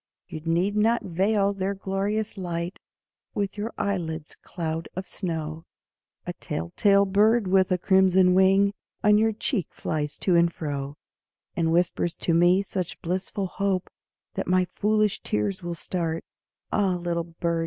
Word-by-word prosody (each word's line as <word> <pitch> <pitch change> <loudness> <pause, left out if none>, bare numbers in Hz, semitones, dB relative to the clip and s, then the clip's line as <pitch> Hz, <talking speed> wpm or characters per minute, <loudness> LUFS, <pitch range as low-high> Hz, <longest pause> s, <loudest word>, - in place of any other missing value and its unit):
You - - -6
need 170 +5 +1
not 225 +3 +2
veil 195 +3 +1
their 195 0 -2
glorious 200 +3 -2
light 175 -2 -4 0.6
With 200 -1 -1
your 210 +3 -3
eyelids' 165 -6 -3
cloud 165 -1 -5
of 185 +1 -5
snow, 160 -3 -4 0.6
A - - -4
tell 85 +1 -5
tale 200 -1 +5
bird 210 +3 +3
with 190 0 +3
a 180 - +3
crimson 190 0 +4
wing 195 +2 +4 0.3
On 210 0 +5
your 220 +1 +3
cheek 215 - -2
flies 150 -2 -3
to 180 - +3
and 170 0 +4
fro; 145 -3 -4 0.6
And 165 -2 +1
whispers 175 0 +1
to 170 - 0
me 175 +3 +4
such 185 -3 -4
blissful 190 +3 -2
hope 190 0 -1 0.4
That - - -3
my 185 0 +3
foolish 210 +2 +1
tears 145 - -1
will 175 -1 -4
start, 165 -1 -3 0.5
Ah, 195 -3 +2
little 170 -1 -2
bird! 170 0 -2
185 Hz, 150 wpm, -26 LUFS, 170-200 Hz, 0.6 s, tale